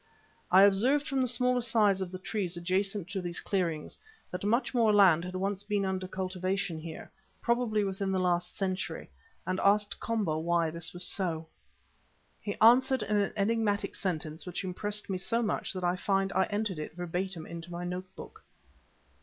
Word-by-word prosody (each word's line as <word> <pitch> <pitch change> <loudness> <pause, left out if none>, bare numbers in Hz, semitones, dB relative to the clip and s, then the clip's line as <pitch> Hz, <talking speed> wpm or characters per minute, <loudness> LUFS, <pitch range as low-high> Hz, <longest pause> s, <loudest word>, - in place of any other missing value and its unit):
I 190 +2 +8
observed 250 +10 +4
from 270 -2 0
the 255 - +2
smaller 250 0 +2
size 215 -5 +3
of 185 -2 -3
the 185 - -5
trees 185 -2 -3
adjacent 190 +2 -1
to 195 -1 -3
these 175 -1 -4
clearings, 170 -6 -2 0.3
that 180 +1 -5
much 230 +7 +1
more 230 -3 +4
land 190 -6 +6
had 180 +1 -6
once 195 +1 -1
been 205 -1 -1
under 190 -1 -2
cultivation 185 -2 -2
here, 160 0 -8 0.3
probably 235 -3 +1
within 195 0 -2
the 190 - +1
last 180 -1 0
century, 185 - -3 0.3
and 185 0 -1
asked 205 +1 +2
Komba 205 -9 -1
why 170 -1 +1
this 170 0 -4
was 175 0 -3
so. 165 -5 -1 1.0
He 205 - -4
answered 250 +2 +5
in 210 0 -1
an 205 -1 +1
enigmatic 210 0 +1
sentence 160 -3 -4
which 180 - -3
impressed 205 +3 -3
me 190 -2 -2
so 230 +5 0
much 210 - -1
that 185 -1 -4
I 175 0 +2
find 195 +1 0
I 190 - +3
entered 205 -5 -2
it 155 - -6
verbatim 175 -1 -3
in 170 0 -7
my 175 0 -5
notebook. 180 +1 -7
190 Hz, 175 wpm, -30 LUFS, 180-210 Hz, 1.0 s, I